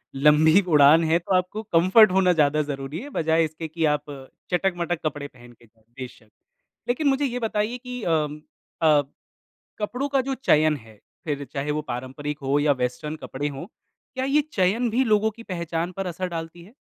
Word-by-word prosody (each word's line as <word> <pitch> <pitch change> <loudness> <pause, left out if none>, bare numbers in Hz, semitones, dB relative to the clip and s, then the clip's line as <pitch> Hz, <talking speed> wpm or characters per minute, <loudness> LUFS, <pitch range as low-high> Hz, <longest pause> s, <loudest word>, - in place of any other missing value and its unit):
लंबी 155 +6 +5
उड़ान 150 +1 +6
है 160 +1 +3
तो 180 +2 -3
आपको 185 +4 -1
कम्फ़र्ट 190 +3 +5
होना 185 -1 +3
ज़्यादा 150 -1 +2
ज़रूरी 140 +1 -5
है 290 - -9
बजाए 160 - +1
इसके 160 +1 -6
कि 160 +1 -2
आप 150 -1 +1 0.5
चटक-मटक 175 -2 0
कपड़े 145 -1 -3
पहन 120 -2 -17
के 120 - -22
जाओ। 110 0 -31 0.2
बेशक, 125 -3 -10 0.6
लेकिन 265 +5 0
मुझे 275 +1 +2
ये 250 -1 -2
बताइए 220 +1 -1
कि 250 -1 -8
अम, 150 -2 -1 0.4
अ, 155 -2 +5 0.8
कपड़ों 250 +7 -2
का 270 -1 +2
जो 270 +1 -3
चयन 155 - +3
है 110 -3 -17 0.3
फिर 145 -2 -3
चाहे 145 +2 -4
वो 150 +1 -1
पारंपरिक 135 +3 -6
हो 140 +2 +1
या 145 0 +3
वेस्टर्न 125 +5 -3
कपड़े 145 +2 -4
हों 140 +3 -6 0.5
क्या 260 0 -1
ये 290 +2 +3
चयन 215 +6 +1
भी 250 +4 +1
लोगों 215 -1 +2
की 230 +2 -13
पहचान 170 -2 -3
पर 195 - -2
असर 180 +1 -4
डालती 165 0 -7
है? 210 +7 -17
165 Hz, 185 wpm, -24 LUFS, 145-210 Hz, 0.8 s, उड़ान